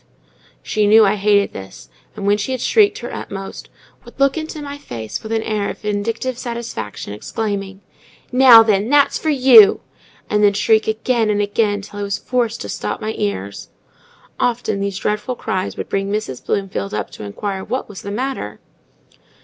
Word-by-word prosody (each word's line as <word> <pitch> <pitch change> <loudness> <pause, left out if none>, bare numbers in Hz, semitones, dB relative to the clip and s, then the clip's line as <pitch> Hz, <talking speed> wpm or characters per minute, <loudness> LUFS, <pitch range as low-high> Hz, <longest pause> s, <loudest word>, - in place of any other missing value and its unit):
She 210 -1 +1
knew 220 +1 +7
I 195 - +3
hated 205 0 +2
this, 95 -9 -10 0.3
and 205 -2 -5
when 205 +1 +3
she 235 +6 -2
had 255 - -3
shrieked 415 -2 +3
her 240 - -7
utmost, 195 0 -7 0.3
would - - -16
look 275 0 +3
into 315 -1 -5
my 285 -1 -7
face 115 - -6
with 220 - -8
an 225 -1 0
air 210 -2 -1
of - - -6
vindictive 225 +4 -3
satisfaction, 235 - -6
exclaiming,—"Now, 215 - +2
then! 210 0 +1
that's 285 0 +3
for 315 - -1
you!" 255 -7 +7 0.5
and 210 0 +1
then 205 -1 +5
shriek 220 +2 +2
again 220 +1 0
and 205 -1 +1
again, 205 0 0
till 205 0 -9
I - - -3
was 200 0 -2
forced 240 -3 -1
to - - -6
stop - - -3
my 220 0 -3
ears. 100 0 -4 0.7
Often 235 -4 0
these 200 -1 -2
dreadful 210 +5 -2
cries 190 -5 -3
would - - -5
bring 195 0 -2
Mrs. 210 -12 -3
Bloomfield 185 - -2
up - - -4
to - - -10
inquire 190 - -4
what 255 - -3
was 205 -3 -10
the 200 - -7
matter? 235 - -4
210 Hz, 175 wpm, -19 LUFS, 195-235 Hz, 0.7 s, knew